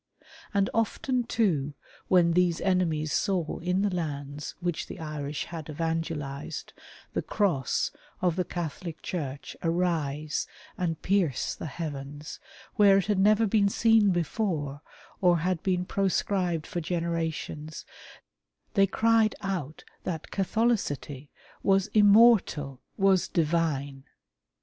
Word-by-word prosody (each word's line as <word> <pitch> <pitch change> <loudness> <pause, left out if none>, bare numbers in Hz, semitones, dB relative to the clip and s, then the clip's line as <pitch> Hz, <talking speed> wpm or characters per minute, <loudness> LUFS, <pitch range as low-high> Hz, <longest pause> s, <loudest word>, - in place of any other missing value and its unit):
And 200 -2 +2
often 240 +3 0
too 155 -13 0 0.3
when 175 -2 +5
these 175 -1 +2
enemies 165 -5 +1
saw 185 -6 0
in 180 +3 0
the 205 -2 0
lands 145 -3 -4
which 175 -2 -2
the - - -8
Irish 150 -2 -4
had 165 -2 -7
evangelized, 160 -3 -3 0.4
the - - 0
Cross 175 - 0 0.3
of 175 -3 +1
the 180 - +1
Catholic 170 -1 -5
Church 145 -6 -5
arise 160 -4 -1 0.3
and 165 -3 -2
pierce 180 -9 +1
the - - -6
heavens, 145 -1 -6 0.4
where 200 -2 +7
it 195 - +1
had 205 -2 +1
never 215 +3 +5
been 205 -1 +3
seen 225 0 +4
before, 165 -5 -1 0.4
or 175 -2 +5
had 175 +1 -1
been 180 -1 0
pro 195 +1 0
scribed 180 -4 0
for 175 - -4
generations, 165 -2 -3 0.9
they 195 -2 +4
cried 225 +1 +3
out 175 -7 -3 0.2
that 160 -3 -4
Catholicity 190 - -1 0.3
was 195 -1 +2
immortal 205 - +5
— - - -44
was 190 -2 +4
divine 150 -5 0
170 Hz, 120 wpm, -28 LUFS, 150-195 Hz, 0.9 s, where